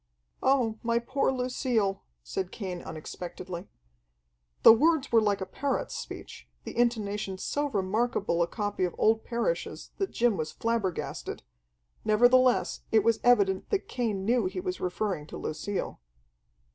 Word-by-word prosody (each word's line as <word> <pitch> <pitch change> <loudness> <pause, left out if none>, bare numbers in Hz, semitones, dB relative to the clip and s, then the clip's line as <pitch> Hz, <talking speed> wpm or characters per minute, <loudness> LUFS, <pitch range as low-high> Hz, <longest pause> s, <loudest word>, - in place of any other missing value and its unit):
"Oh 245 -5 +2
my 235 -1 +1
poor 260 +4 0
Lucille!" 250 -6 0 0.2
said 180 - -3
Cain 185 -5 -5
unexpectedly. 175 +3 -7 1.0
The - - +11
words 305 +3 +2
were 230 -1 +6
like 205 -2 +1
a - - -1
parrot's 270 +8 -2
speech, - - -8
the - - -7
intonation 210 -5 0
so 290 +9 -1
remarkable 200 -4 0
a 170 - +3
copy 205 -2 -2
of 180 - -1
old 220 +1 +3
Parrish's 240 - -2
that 390 -1 0
Jim 235 -4 +2
was 155 0 -3
flabbergasted. 225 -6 -2 0.6
Nevertheless 245 +3 +4
it 220 -2 +5
was 230 0 +3
evident 200 -6 +3
that 405 - -1
Cain 215 -6 -2
knew 235 -2 +2
he 185 0 -4
was 180 0 -3
referring 180 -4 -2
to - - -8
Lucille. 195 - -4
215 Hz, 140 wpm, -28 LUFS, 190-245 Hz, 1.0 s, The